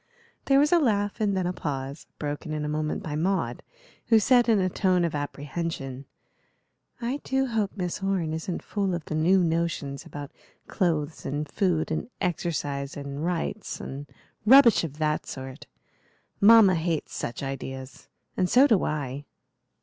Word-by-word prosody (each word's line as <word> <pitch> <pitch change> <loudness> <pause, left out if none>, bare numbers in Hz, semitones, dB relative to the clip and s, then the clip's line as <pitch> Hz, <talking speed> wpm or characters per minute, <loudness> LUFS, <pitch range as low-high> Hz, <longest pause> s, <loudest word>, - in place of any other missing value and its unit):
There 275 - +4
was 295 +2 +4
a 350 - +6
laugh 205 -6 0
and 200 -2 +1
then 185 - 0
a 180 - -1
pause, 140 -2 -5
broken 150 +1 -4
in 150 -1 -2
a - - -2
moment 155 0 -2
by 150 -2 -4
Maud, 185 +5 -1 0.5
who 225 - +6
said, 245 +2 +4
in 220 -3 +4
a 185 - +2
tone 185 -1 +2
of 165 - -2
apprehension: 145 -2 -4 0.9
"I 245 +3 -2
do 265 0 +1
hope 220 -5 -1
Miss 180 -1 -3
Orne 190 -5 0
isn't 160 +2 -4
full 195 -3 -1
of 170 - -6
the - - -5
new 175 +4 +3
notions 160 -4 -1
about 145 -1 -8 0.3
clothes 160 -4 -1
and 145 +2 -3
food 170 -4 0
and 160 - -2
exercise 145 -6 -2
and 140 +1 -5
rights 180 +4 -3
and 140 +2 -7 0.4
rubbish 240 -1 +7
of 150 -3 -5
that 155 -1 -1
sort. 130 +1 -8 0.7
Mamma 210 -2 +8
hates 165 -2 -2
such 120 - -4
ideas, 135 -1 -6 0.3
and 180 -1 +1
so 260 +3 +6
do 220 -9 +3
I." 145 -2 -3
165 Hz, 160 wpm, -26 LUFS, 145-195 Hz, 0.9 s, Mamma